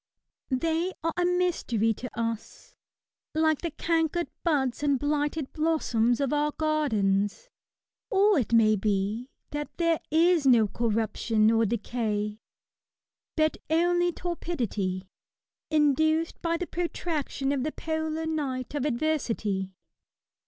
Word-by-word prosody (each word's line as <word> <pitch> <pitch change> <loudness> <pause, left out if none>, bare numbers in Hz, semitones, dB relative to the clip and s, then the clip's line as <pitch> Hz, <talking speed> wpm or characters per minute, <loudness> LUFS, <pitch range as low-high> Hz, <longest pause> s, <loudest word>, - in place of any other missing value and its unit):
They 330 +6 0
are 330 0 0
a 355 - +1
mystery 345 - +1
to 250 +4 -7
us, 230 - -4 0.6
like 315 -1 +2
the 340 - -2
cankered 330 +1 0
buds 275 -7 +1
and 285 -2 +2
blighted 295 +1 -1
blossoms 250 -8 +1
of 280 0 0
our 295 0 +1
gardens. 230 - 0 0.6
Or 405 -4 +4
it 235 - -2
may 220 -2 +5
be, 210 +4 -1 0.2
that 295 0 -3
there 335 -2 +2
is 325 -1 +4
no 235 -4 +6
corruption 220 0 +1
or 225 -1 +3
decay, 210 -1 -2 1.0
but 310 0 +2
only 350 +2 +3
torpidity, 235 - -3 0.6
induced 315 +2 +2
by 335 0 0
the 360 - -3
protraction 325 -5 -2
of 280 -2 0
their 305 +4 -1
polar 315 0 -3
night 280 -6 -3
of 290 -2 -1
adversity. 225 -9 -1
295 Hz, 115 wpm, -27 LUFS, 230-325 Hz, 1.0 s, no